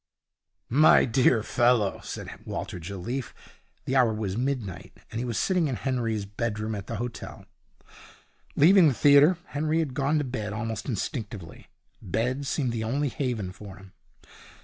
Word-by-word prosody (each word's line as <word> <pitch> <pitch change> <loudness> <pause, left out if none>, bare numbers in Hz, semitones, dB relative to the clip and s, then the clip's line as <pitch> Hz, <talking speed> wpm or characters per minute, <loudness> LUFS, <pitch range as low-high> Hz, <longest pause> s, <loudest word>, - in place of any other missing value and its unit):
'My 150 +6 +6
dear 125 -2 +3
fellow,' 120 -5 +2
said - - -6 0.2
Walter 90 - -5
Jelliffe. 100 +9 -5 0.5
The 130 - -1
hour 125 -4 +4
was 105 -3 -3
midnight, 120 -7 -3 0.2
and 115 - -4
he 125 - -2
was 115 -4 -3
sitting 180 - +1
in 130 - -2
Henry's 115 -5 -2
bedroom 110 +1 -3
at 100 -2 -6
the 115 - -4
hotel. 120 +2 -6 1.1
Leaving 175 +3 +7
the 135 - +2
theatre, 145 +6 +6
Henry 155 +2 0
had 155 -5 -1
gone 140 +3 +1
to 150 - +1
bed 110 -6 -4
almost 115 +3 -4
instinctively. 105 - -5 0.3
Bed 125 +9 -2
seemed 135 -4 0
the 115 -1 -3
only 140 +6 0
haven 120 -9 -3
for 95 0 -11
him. 95 -1 -15
120 Hz, 150 wpm, -27 LUFS, 105-140 Hz, 1.1 s, Leaving